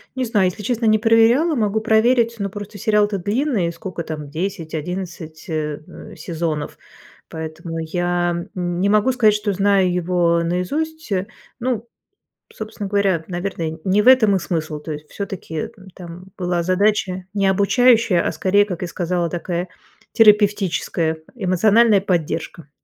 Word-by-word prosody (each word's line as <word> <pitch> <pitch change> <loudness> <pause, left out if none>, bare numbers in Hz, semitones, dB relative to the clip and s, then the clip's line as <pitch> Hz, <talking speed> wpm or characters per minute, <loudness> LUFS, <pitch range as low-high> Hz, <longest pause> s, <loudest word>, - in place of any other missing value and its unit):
Не 260 - -1
знаю, 210 -5 +2
если 210 +4 -5
честно, 235 +2 -1
не 215 0 +5
проверяла, 235 +8 +4
могу 215 -2 +1
проверить, 230 +1 +3
но 200 0 -2
просто 205 0 -8
сериал-то 210 0 +1
длинный, 205 - 0
сколько 170 0 -6
там 150 -3 -6
10-11, 165 -1 -5
э, 150 -2 -3
э, - - -12
сезонов, 160 -2 -4 0.5
поэтому 160 +1 -6
я 175 +1 -1 0.2
н 175 -1 -2
не 200 +2 +2
могу 215 +5 +3
сказать, 220 -4 +4
что 210 -1 -1
знаю 195 -1 +2
его 175 -1 +1
наизусть. 290 - -3 0.5
Ну, 235 -2 -2 0.7
собственно 215 -2 -6
говоря, 195 -5 +1
наверное, 175 -3 -4
не 200 +2 +2
в 235 - -1
этом 225 -6 +6
и 190 - +1
смысл, 155 -3 -3
то 155 - -7
есть 150 +1 -10
всё-таки 190 -6 -5 0.2
там 175 0 -10
была 175 -2 -1
задача 185 0 +1
не 200 -1 +1
обучающая, 205 0 +3
а - - 0
скорее, 195 +5 +2
как 180 -4 -6
и - - -3
сказала, 175 -1 -2
такая 175 +1 -3 0.5
терапевтическая 205 -6 +3 0.2
эмоциональная 210 +1 +3
поддержка. 165 -3 -3
190 Hz, 140 wpm, -20 LUFS, 170-215 Hz, 0.7 s, этом